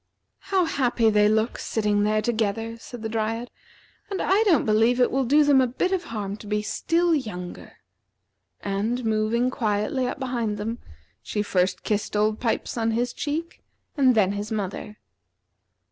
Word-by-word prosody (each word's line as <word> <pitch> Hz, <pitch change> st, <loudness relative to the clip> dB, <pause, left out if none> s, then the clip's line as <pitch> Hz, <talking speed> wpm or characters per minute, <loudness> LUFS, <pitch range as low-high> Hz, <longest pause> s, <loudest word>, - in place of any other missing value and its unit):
"How 375 Hz, -3 st, +3 dB
happy 245 Hz, -7 st, +2 dB
they 210 Hz, 0 st, +4 dB
look, 220 Hz, +2 st, +1 dB
sitting 210 Hz, -2 st, 0 dB
there 215 Hz, +1 st, +1 dB
together," 225 Hz, 0 st, -1 dB
said 240 Hz, 0 st, -10 dB
the -, -, -1 dB
Dryad; 225 Hz, +2 st, -2 dB, 0.6 s
"and 390 Hz, -2 st, -3 dB
I 390 Hz, +3 st, +3 dB
don't 335 Hz, -, +4 dB
believe 225 Hz, +3 st, +3 dB
it 250 Hz, -, +3 dB
will 270 Hz, 0 st, +1 dB
do 295 Hz, +5 st, +5 dB
them 285 Hz, -2 st, +5 dB
a 255 Hz, -, +2 dB
bit 265 Hz, +10 st, -1 dB
of 370 Hz, -2 st, -1 dB
harm 205 Hz, -5 st, -4 dB
to 215 Hz, -, -12 dB
be 210 Hz, 0 st, -1 dB
still 335 Hz, +10 st, +1 dB
younger." 195 Hz, -, -4 dB, 0.9 s
And 215 Hz, +5 st, -2 dB
moving 220 Hz, +3 st, +1 dB
quietly 220 Hz, +3 st, 0 dB
up 250 Hz, -, -4 dB
behind 240 Hz, -5 st, -2 dB
them, 225 Hz, +3 st, -4 dB, 0.4 s
she 205 Hz, -, -2 dB
first 185 Hz, -2 st, 0 dB
kissed 210 Hz, 0 st, -2 dB
Old 215 Hz, +1 st, +1 dB
Pipes 235 Hz, 0 st, -1 dB
on 225 Hz, 0 st, +1 dB
his 240 Hz, +2 st, 0 dB
cheek 320 Hz, +3 st, -4 dB, 0.3 s
and 260 Hz, -5 st, +4 dB
then 200 Hz, -3 st, +3 dB
his 205 Hz, +2 st, -4 dB
mother. 210 Hz, 0 st, -4 dB
225 Hz, 165 wpm, -25 LUFS, 210-255 Hz, 0.9 s, do